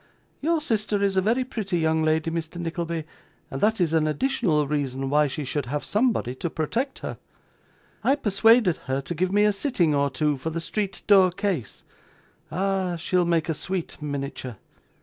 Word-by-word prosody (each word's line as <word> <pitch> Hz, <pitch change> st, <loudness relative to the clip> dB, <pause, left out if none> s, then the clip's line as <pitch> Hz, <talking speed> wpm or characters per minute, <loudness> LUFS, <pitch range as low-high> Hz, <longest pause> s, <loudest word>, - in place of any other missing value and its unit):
Your 325 Hz, +2 st, +1 dB
sister 215 Hz, -6 st, 0 dB
is 195 Hz, -1 st, +1 dB
a 190 Hz, -, +4 dB
very 230 Hz, +6 st, +2 dB
pretty 210 Hz, -7 st, -2 dB
young 160 Hz, -1 st, +2 dB
lady, 155 Hz, +1 st, +1 dB
Mr. 165 Hz, +1 st, -4 dB
Nickleby, 170 Hz, -1 st, -3 dB, 0.5 s
and 135 Hz, -, -4 dB
that 220 Hz, +1 st, +2 dB
is 165 Hz, -3 st, +1 dB
an 155 Hz, -1 st, +3 dB
additional 155 Hz, -, +1 dB
reason 135 Hz, -2 st, -2 dB
why 150 Hz, 0 st, +4 dB
she 145 Hz, +2 st, -4 dB
should 140 Hz, -1 st, -2 dB
have 145 Hz, +3 st, -2 dB
somebody 215 Hz, -, +1 dB
to 170 Hz, -, -2 dB
protect 230 Hz, -, -2 dB
her. -, -, -5 dB, 0.8 s
I 275 Hz, -, +4 dB
persuaded 225 Hz, -, +4 dB
her 130 Hz, +1 st, 0 dB
to 155 Hz, -, -5 dB
give 180 Hz, +3 st, 0 dB
me 205 Hz, +1 st, +4 dB
a 210 Hz, 0 st, +4 dB
sitting 195 Hz, -, +1 dB
or 140 Hz, 0 st, +2 dB
two, 150 Hz, +2 st, 0 dB
for 130 Hz, +5 st, -4 dB
the 165 Hz, +1 st, -3 dB
street 195 Hz, +3 st, -3 dB
door 195 Hz, -3 st, +6 dB
case. 180 Hz, -, -3 dB, 0.7 s
'Ah! 190 Hz, -1 st, 0 dB
she'll 180 Hz, +1 st, +1 dB
make 165 Hz, -2 st, +1 dB
a 165 Hz, -, 0 dB
sweet 180 Hz, 0 st, -4 dB
miniature. 140 Hz, -5 st, -4 dB
170 Hz, 180 wpm, -25 LUFS, 150-205 Hz, 0.8 s, door